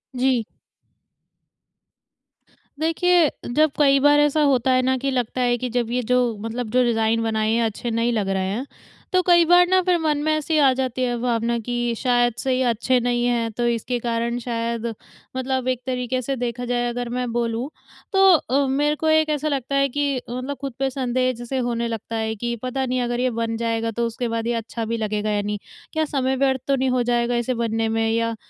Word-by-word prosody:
जी। 255 -2 +2 2.4
देखिए 330 0 +3 0.3
जब 310 -1 +4
कई 275 -2 +5
बार 290 +1 +5
ऐसा 295 +1 +3
होता 265 -3 +3
है 255 0 +4
ना 260 +1 +1
कि 275 +2 -2
लगता 250 -1 -1
है 245 -1 +2
कि 250 +1 -3
जब 240 -1 -1
ये 250 +1 0
जो - - +5 0.2
मतलब 225 +1 -4
जो 250 +1 +3
डिजाइन 230 -1 +1
बनाए 220 -1 0
हैं 230 +1 +2
अच्छे 225 +2 -3
नहीं 230 +1 +1
लग 205 -4 -1
रहे 190 -1 0
हैं। 230 +7 -3 0.5
तो 370 - +4
कई 345 -1 +6
बार 355 +1 +6
ना 375 +1 +4
फ़िर 360 -1 +2
मन 310 -2 +1
में 310 - +1
ऐसी 310 +1 0
आ 275 -2 +5
जाती 255 -1 -2
है 245 -1 0
भावना 235 -1 0
कि 240 -1 -1
शायद 245 -1 +2
से 265 - -1
ये 255 +1 +1
अच्छे 245 +3 +1
नहीं 240 0 0
हैं, 235 -2 0
तो 240 +3 -2
इसके 235 +1 -1
कारण 235 0 -1
शायद 235 -1 -3 0.5
मतलब 260 0 -2
एक 255 -1 0
तरीके 255 0 -2
से 270 +2 -2
देखा 245 0 -3
जाए 245 0 0
अगर 240 0 -4
मैं 250 0 -2
बोलूँ 235 +2 -2 0.4
तो 385 0 +5
अ, 280 -2 0
मेरे 290 +3 +1
को 315 - -2
एक 315 0 +3
ऐसा 300 0 -1
लगता 275 -2 -2
है 275 0 +3
कि, 280 -1 -1
मतलब 255 +3 -4
खुद 275 -2 -4
पे 270 0 +1
संदेह 255 -1 0
जैसे 240 +2 -5
होने 235 -2 -1
लगता 230 0 -5
है 220 0 -2
कि 235 +2 -3
पता 265 +1 -2
नहीं 255 0 -1
अगर 240 0 -1
ये 255 +1 +2
बन 230 0 -1
जाएगा 230 0 -1
तो 235 +2 -1
उसके 235 +2 -3
बाद 230 0 -2
ये 240 - +1
अच्छा 230 0 -4
भी 230 +1 -2
लगेगा 215 -1 -2
या 205 0 +1
नहीं। 210 0 -3 0.4
क्या 315 0 +1
समय 265 -3 0
व्यर्थ 265 -1 +1
तो 275 - +3
नहीं 265 0 0
हो 250 -1 +1
जाएगा 240 0 +1
इसे 240 +1 0
बनने 225 -1 -1
में, 225 0 0
या 230 0 0
245 Hz, 215 wpm, -22 LUFS, 230-270 Hz, 2.4 s, कई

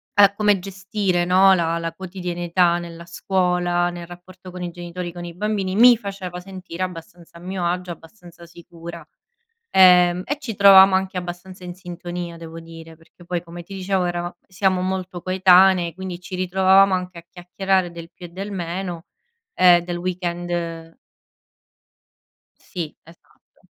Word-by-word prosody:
a 200 -1 +6
come 205 -1 +2
gestire 190 -1 -2
no 190 +2 +5
la 170 -2 0
la 165 0 -4
quotidianità 175 -1 -1
nella 170 0 -9
scuola, 175 0 0
nel 175 -1 -8
rapporto 180 +1 -13
con 180 0 -8
i 175 - -4
genitori, 175 0 -7
con 175 0 -8
i 175 - -7
bambini, 195 0 -2
mi 245 +2 +8
faceva 195 -4 -7
sentire 185 -2 -7
abbastanza 170 -1 -9
a - - -14
mio 185 0 -4
agio, 180 +1 -2
abbastanza 170 0 -14
sicura. 170 0 -11 0.7
Ehm, 180 -1 +6
e 290 - -3
ci 240 -7 -5
trovavamo 195 -1 +8
anche 190 0 -3
abbastanza 180 +1 -8
in 175 0 -7
sintonia 175 -1 -7
devo 165 0 -10
dire 165 0 -12
perché 165 +2 -20
poi 175 0 -3
come 175 0 -10
ti 195 +3 -11
dicevo, 190 -1 -1
erava 175 0 -4
siamo 185 0 0
molto 185 -1 -4
coetanee 185 -2 +4
quindi 185 -1 -6
ci 180 +1 -9
ritrovavamo 190 +1 +4
anche 180 -1 -4
a 170 - -12
chiacchierare 185 +1 -1
del 170 0 -10
più 180 - -11
e - - -14
del 195 +4 -7
meno, 175 -1 -5 0.5
e 175 -1 +6
del 175 0 -4
weekend 175 -2 -4 1.6
Sì 170 -5 -6
esatto. 165 +1 -23
180 Hz, 155 wpm, -21 LUFS, 175-190 Hz, 1.6 s, mi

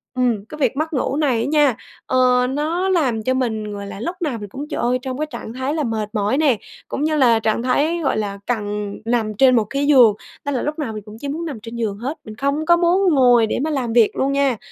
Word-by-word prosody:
ừm, 240 -5 0
cái 305 - -10
việc 270 -3 0
mất 315 +2 -2
ngủ 265 0 -1
này 270 -7 +1
á - - -1
nha, 290 -4 +3 0.3
ờ, 250 -1 +3
nó 320 +7 -1
làm 265 -12 +1
cho 255 - +1
mình, 220 -5 -2
gọi 200 0 -6
là, 200 - -8
lúc 340 - -3
nào 295 -8 -1
mình 205 -2 -8
cũng, 280 +8 -7
trời - - -3
ơi, 250 +1 +1
trong 255 0 -4
cái 305 - -1
trạng 225 - -7
thái 260 +3 -2
là 310 -1 -1
mệt 220 -4 -2
mỏi 210 +4 0
nè, 285 -6 +3 0.3
cũng 280 - -3
như 310 0 +1
là 240 -5 +4
trạng 220 +1 0
thái, 295 +7 +1
gọi 270 - +1
là, 200 -2 -3
cần 210 -3 -2
nằm 225 -2 0
trên 255 +4 +5
một 225 - +3
cái 275 +6 -2
giường, 250 -7 +7 0.3
nên 285 - -1
là 250 - -1
lúc 300 +2 -3
nào 260 -7 -3
mình 215 -1 -7
cũng 215 0 -11
chỉ 285 - -5
muốn 315 +4 -3
nằm 285 -8 -5
trên 230 +2 -9
giường 220 -4 -2
hết. 265 +8 -4
Mình 215 - -10
không 280 +6 -1
có 345 +1 +5
muốn 350 +1 +3
ngồi 245 -4 +5
để - - -2
mà 315 - -1
làm 255 -6 -2
việc 230 -2 +4
luôn 275 +1 0
nha. 275 -4 +1
255 Hz, 265 wpm, -20 LUFS, 225-295 Hz, 0.3 s, giường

